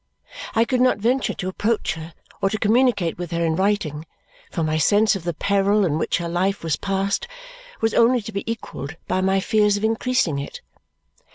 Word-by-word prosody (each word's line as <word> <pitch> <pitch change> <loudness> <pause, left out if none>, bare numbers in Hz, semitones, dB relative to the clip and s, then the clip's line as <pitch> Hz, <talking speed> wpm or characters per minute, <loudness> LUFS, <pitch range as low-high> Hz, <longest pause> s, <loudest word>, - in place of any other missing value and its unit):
I 225 +1 +4
could 250 +1 0
not 255 0 +4
venture 245 +5 0
to 185 - -4
approach 210 +4 -1
her 160 0 -9 0.3
or 195 - +2
to 215 - -2
communicate 215 -6 +2
with 175 -2 -4
her 170 0 -1
in 160 -1 +1
writing, 170 -6 -1 0.4
for 165 - -2
my 155 0 0
sense 205 +6 +4
of 180 -3 -6
the 175 - -1
peril 200 +3 +2
in 155 -2 0
which - - 0
her 170 -1 -3
life 185 +3 -1
was 160 -3 0
passed 195 - -1 0.5
was 225 -1 +1
only 235 0 +4
to 220 - -7
be 200 +2 -3
equalled 160 -9 -6
by 185 - 0
my 190 +1 +2
fears 210 +1 +2
of 205 - -5
increasing 225 - +1
it. 140 - -7
195 Hz, 195 wpm, -22 LUFS, 170-220 Hz, 0.5 s, I